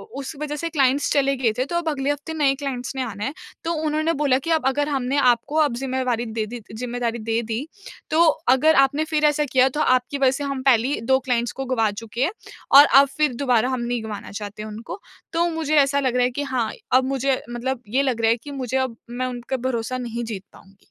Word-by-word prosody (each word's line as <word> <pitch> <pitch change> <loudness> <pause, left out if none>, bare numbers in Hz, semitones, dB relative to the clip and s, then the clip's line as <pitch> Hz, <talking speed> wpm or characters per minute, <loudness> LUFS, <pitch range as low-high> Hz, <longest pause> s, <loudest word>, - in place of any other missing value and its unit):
उस 275 +3 -6
वजह 295 0 -3
से 335 +3 -3
क्लाइंट्स 280 -2 +2
चले 275 -1 +2
गए 245 -3 +2
थे 255 - +1
तो 345 - -5
अब 340 -2 -1
अगले 285 -1 -1
हफ़्ते 290 +2 -5
नए 290 -4 +2
क्लाइंट्स 270 -2 -5
ने 265 - -2
आना 210 -4 -6
है। 275 - -3 0.3
तो 335 - -1
उन्होंने 310 +2 +1
बोला 280 -3 +3
कि 290 - -6
अब 320 -5 +1
अगर 290 +2 0
हमने 270 -1 -1
आपको 250 +1 +2
अब 290 -6 +1
ज़िम्मेवारी 255 -2 -1
दे 220 -1 -3
दी 240 +2 -7
ज़िम्मेदारी 240 0 -3
दे 225 +1 -1
दी, 230 +5 -4 0.4
तो 315 +2 +3 0.3
अगर 315 +4 +4
आपने 280 +3 0
फिर 305 0 +3
ऐसा 300 0 +2
किया 260 0 +4
तो 295 +3 -2
आपकी 255 0 +2
वजह 270 -2 +4
से 275 +2 -4
हम 275 -2 -3
पहले 250 -3 +4
ही 285 -4 -2
2 265 - +5
क्लाइंट्स 240 -3 -1
को - - -3
गँवा 235 -4 +1
चुके 225 +4 -4
हैं 320 - +1 0.5
और 290 - +10 0.2
अब 280 - +2
फिर 300 -4 +2
दोबारा 250 -2 +2
हम 255 -2 -2
नहीं 240 -1 -2
गँवाना 215 -2 -7
चाहते 205 0 -7
हैं 215 - -7
उनको। 230 - -8 0.3
तो 340 +1 +2
मुझे 320 -2 -1
ऐसा 280 -1 +4
लग 260 -3 0
रहा 250 - +3
है 250 - 0
कि 285 +4 -3
हाँ, 255 -5 -1 0.2
अब 260 +1 +5
मुझे 270 0 0
मतलब 240 +1 -3
ये 255 +6 +1
लग 250 -4 -1
रहा 225 - +3
है 230 - +2
कि 290 - -8
मुझे 265 -2 -2
अब 260 -3 -2
मैं 245 +2 -3
उनका 250 +1 -4
भरोसा 245 0 -2
नहीं 240 -1 -4
जीत 215 -5 -6
पाऊँगी। 195 0 -19
260 Hz, 240 wpm, -22 LUFS, 240-285 Hz, 0.5 s, और